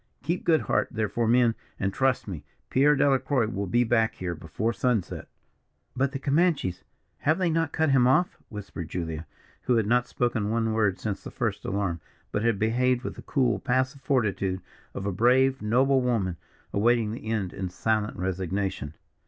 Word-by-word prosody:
Keep 170 +2 -1
good 160 -2 +4
heart, - - +1
therefore, 110 +1 -1
men, 120 0 +4 0.3
and, 95 -1 -1
trust 135 -3 +1
me, 85 -7 -6 0.3
Pierre 145 +3 +5
Delacroix 135 -3 +2
will 100 -3 -3
be 120 +7 +3
back 110 -1 +2
here 90 -2 -3
before 90 +8 -3
sunset." 110 -1 -1 0.7
"But 135 +1 +1
the 140 - -3
Comanches! 140 - +1 0.4
have 155 +2 +2
not 165 -4 +1
they - - -8
cut 160 -2 +3
him 125 -2 +5
off?" 175 +8 +2
whispered 100 -6 -7
Julia, 80 -3 -4 0.4
who 125 - +3
had 110 -2 +2
not 120 +3 +2
spoken 115 -4 -1
one 115 0 0
word 105 -4 +2
since 105 -3 -4
the - - -6
first 105 -4 -3
alarm, 95 -4 -1 0.3
but 105 - -1
had 115 -2 +2
behaved 125 +4 +1
with - - -4
the - - -10
cool, 130 -4 +1
passive 130 +2 0
fortitude 100 -9 0 0.3
of 95 - -4
a 100 - 0
brave, 130 +6 +3
noble 130 +5 +3
woman, 105 -8 0 0.4
awaiting 115 +1 +2
the 110 -1 -7
end 105 -5 -1
in 95 -2 -4
silent 105 +3 -1
resignation. 95 -4 -2
115 Hz, 175 wpm, -27 LUFS, 100-130 Hz, 0.7 s, Pierre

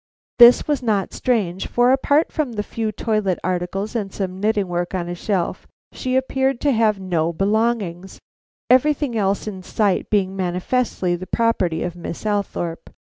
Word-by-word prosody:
This 240 +1 +8
was 295 -3 0
not 210 -6 0
strange; 200 -8 -1
for, 245 +1 +3
apart 285 +3 +2
from 260 -8 -2
a 210 - 0
few 220 0 -3
toilet 215 -4 -1
articles 185 +4 -2
and 205 -4 -2
some 185 -1 -4
knitting 210 -1 +1
work 175 +1 -2
on 175 -2 -2
a 175 - -3
shelf, 180 0 -2 0.2
she 255 -1 -3
appeared 265 0 0
to 290 - +2
have 220 -4 +2
no 170 -3 0
belongings; 195 -1 -1 0.5
everything 275 0 +3
else 200 -2 0
in 195 -3 -6
sight 200 +1 0
being 195 -2 +1
manifestly 185 +1 -1
the 185 +2 -8
property 190 -8 0
of 175 -1 -4
Miss 175 +2 -7
Althorpe. 200 -5 -2
205 Hz, 160 wpm, -21 LUFS, 180-235 Hz, 0.5 s, This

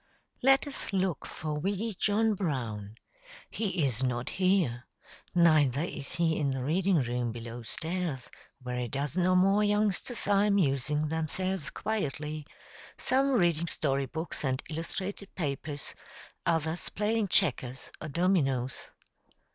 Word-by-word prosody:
Let 270 +3 +5
us 285 -7 -5
look 190 -5 0
for 150 -1 -4
wee 200 +6 -1
Joe 215 +3 +2
Brown; 115 - -3 0.6
he 190 -8 0
is 125 -2 -1
not 125 -1 -1
here, 180 -11 +1 0.5
neither 155 -5 +5
is 145 -5 -5
he 165 -2 +2
in 145 -2 +1
the 130 -1 -2
reading 170 +2 +2
room 120 0 -1
below 115 +1 -7
stairs, 160 +2 -3 0.3
where 125 0 -3
a 125 - -1
dozen 145 +8 0
or 185 - +4
more 195 +3 +5
youngsters 210 +2 +1
are 205 0 +4
amusing 150 -6 +2
themselves 160 0 -1
quietly, 155 -6 -3 0.5
some 270 +2 +2
reading 170 -7 +3
story 140 -4 0
books 160 +2 -4
and 130 -1 0
illustrated 190 +5 -5
papers, 145 -2 -3 0.5
others 165 0 0
playing 215 +1 0
checkers 130 -9 +1
or 155 - -4
dominos. 140 -7 +1
160 Hz, 130 wpm, -30 LUFS, 135-190 Hz, 0.6 s, Let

